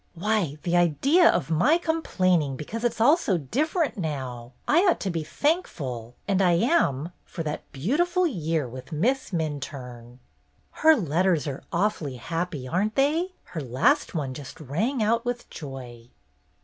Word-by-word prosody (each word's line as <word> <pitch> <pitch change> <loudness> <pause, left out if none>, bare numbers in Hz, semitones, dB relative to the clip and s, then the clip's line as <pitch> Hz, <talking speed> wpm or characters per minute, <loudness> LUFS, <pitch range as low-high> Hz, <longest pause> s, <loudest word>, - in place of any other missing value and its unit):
"Why, 180 -5 0
the 175 0 0
idea 265 - +4
of - - 0
my 250 - +4
complaining 185 - +1
because 220 - -6
it 240 - +3
's - - -13
all 285 +9 +6
so 195 - 0
different 295 - -1
now! 130 -7 -4
I 315 - +5
ought 350 - +3
to 195 - -1
be 165 -2 -2
thank 320 - +1
ful, 120 -4 -6
and 195 -1 +2
I 180 -2 +4
am, 170 - +2
for 165 - -6
that 150 -1 -5
beautiful 345 - +1
year 165 - -1
with 130 +6 -10
Miss 235 - 0
Minturne." 135 - -5 0.5
"Her 320 0 +5
letters 175 - +1
are 140 -1 -4
awfully 170 -7 0
happy, 165 0 -4
are 180 +9 +1
n't 215 - -4
they? 320 +7 +1
Her 165 - -6
last 140 - +1
one 140 -5 -2
just 135 0 -9
rang 210 - -1 0.2
with 245 0 -3
joy." 125 -5 -9
170 Hz, 160 wpm, -26 LUFS, -, 0.5 s, all